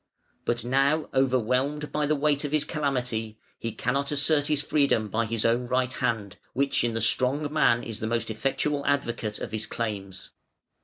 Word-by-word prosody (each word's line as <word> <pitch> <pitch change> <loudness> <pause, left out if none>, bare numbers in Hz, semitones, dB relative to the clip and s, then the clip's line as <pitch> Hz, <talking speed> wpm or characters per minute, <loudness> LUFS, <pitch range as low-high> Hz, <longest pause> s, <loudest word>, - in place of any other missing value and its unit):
But 120 0 -1
now 140 +5 +2
overwhelmed 130 +3 +1
by 150 -1 0
the 155 - +2
weight 145 0 +1
of 145 - -3
his 155 -1 +2
calamity, 125 -8 -2 0.2
he 115 - -3
cannot 135 +6 -1
assert 145 0 +3
his 150 -2 +1
freedom 140 -7 +2
by 115 +3 0
his 115 0 -2
own 120 +2 +2
right 130 0 0
hand, 105 -6 -2 0.2
which 140 -2 +2
in 115 -1 0
the 115 - 0
strong 140 +6 +2
man 120 -6 +3
is 115 -2 -6
the 110 - -2
most 115 0 -1
effectual 140 +5 -1
advocate 115 -6 -1
of - - -6
his 110 -1 -3
claims. 100 -4 -5
125 Hz, 175 wpm, -27 LUFS, 115-145 Hz, 0.2 s, assert